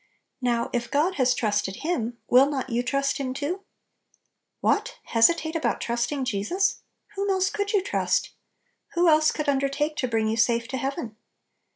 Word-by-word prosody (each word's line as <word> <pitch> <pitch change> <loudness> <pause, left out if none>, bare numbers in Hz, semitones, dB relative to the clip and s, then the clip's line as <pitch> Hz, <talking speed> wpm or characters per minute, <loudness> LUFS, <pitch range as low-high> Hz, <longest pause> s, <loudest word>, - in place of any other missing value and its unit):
Now, 240 -2 0
if 240 -1 -1
God 310 +5 +1
has 255 -2 +3
trusted 205 -3 0
Him, 240 -9 -1
will 265 +3 +6
not 265 -3 -3
you 235 +1 +1
trust 275 +3 0
Him 260 -2 -3
too? 310 +8 -3 1.0
What! - - 0
hesi 230 +9 +5
tate 315 0 -5
about 330 - 0
trusting 240 +4 -1
Jesus? 265 - 0 0.3
Whom 400 0 -2
else 380 0 +2
could 405 0 -2
you 405 -4 +2
trust? - - 0 0.6
Who 345 +1 +3
else 310 -1 +5
could 305 -1 -4
un 280 -1 +3
dertake 285 +3 -1
to 255 - 0
bring 225 -2 0
you 220 +1 -1
safe 235 0 +2
to 260 - -3
heaven? 255 -5 -4
275 Hz, 175 wpm, -25 LUFS, 235-320 Hz, 1.0 s, will